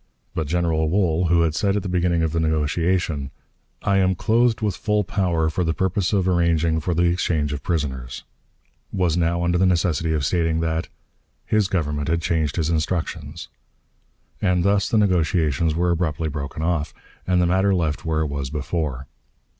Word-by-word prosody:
But 80 -3 -2
General 80 -1 0
Wool, 90 -2 +1
who 85 0 +3
had 80 -2 +1
said 100 +4 +1
at 100 - -1
the - - -4
beginning 90 -2 +1
of 80 - 0
the 85 - -1
negotiation, 80 -1 0 0.5
"I 100 - +2
am 95 -1 +2
clothed 115 +4 +2
with 105 -3 -1
full 105 -1 0
power 90 -4 0
for 90 +3 -1
the 80 -1 -1
purpose 95 0 0
of 95 -3 +1
arranging 85 -2 +2
for 85 +2 -2
the 85 - +2
exchange 85 -4 0
of 70 - -4
prisoners," 65 -6 -3 0.7
was 90 -4 +1
now 85 0 +1
under 85 0 +1
the 95 - +4
necessity 85 -2 +1
of 75 -3 0
stating 80 +2 +1
that 80 0 -1 0.6
"his 110 -3 +2
Government 75 -6 -2
had 85 +1 +1
changed 80 -3 -1
his 80 -2 0
instructions." 80 -1 -3 0.9
And 90 -3 +2
thus 100 +1 +2
the 110 - +2
negotiations 85 -5 +1
were 90 +1 +1
abruptly 80 -2 -1
broken 70 +1 -5
off, 80 -3 -1 0.3
and 90 -1 +3
the 90 - +3
matter 95 +3 +2
left 80 -3 -1
where 80 -2 0
it 80 - 0
was 70 -2 -4
before. 75 -2 -3
85 Hz, 180 wpm, -22 LUFS, 80-90 Hz, 0.9 s, the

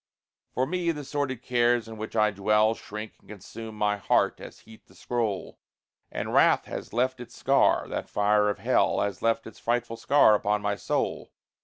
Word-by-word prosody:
For 130 - -1
me, 175 +3 -1
the 150 -2 -6
sordid 135 -3 -3
cares 120 -1 +2
in 115 - -8
which 110 +1 -7
I 105 -1 +3
dwell 105 +2 +2
Shrink 105 0 -8
and - - -25
consume 110 +2 -9
my 105 -1 +1
heart, 100 - +1
as - - -11
heat 110 0 -17
the - - -21
scroll; 115 -6 -3 0.5
And - - -4
wrath - - +4
has - - -7
left 130 +2 0
its 120 -1 -11
scar 135 +1 +3
that - - -5
fire 105 0 +2
of 105 - -2
hell - - +1
Has 100 0 -3
left 115 0 +1
its 110 - -11
frightful 120 -1 -1
scar 140 -5 +5
upon 105 0 0
my 100 0 0
soul. - - -2
110 Hz, 185 wpm, -27 LUFS, 105-120 Hz, 0.5 s, scar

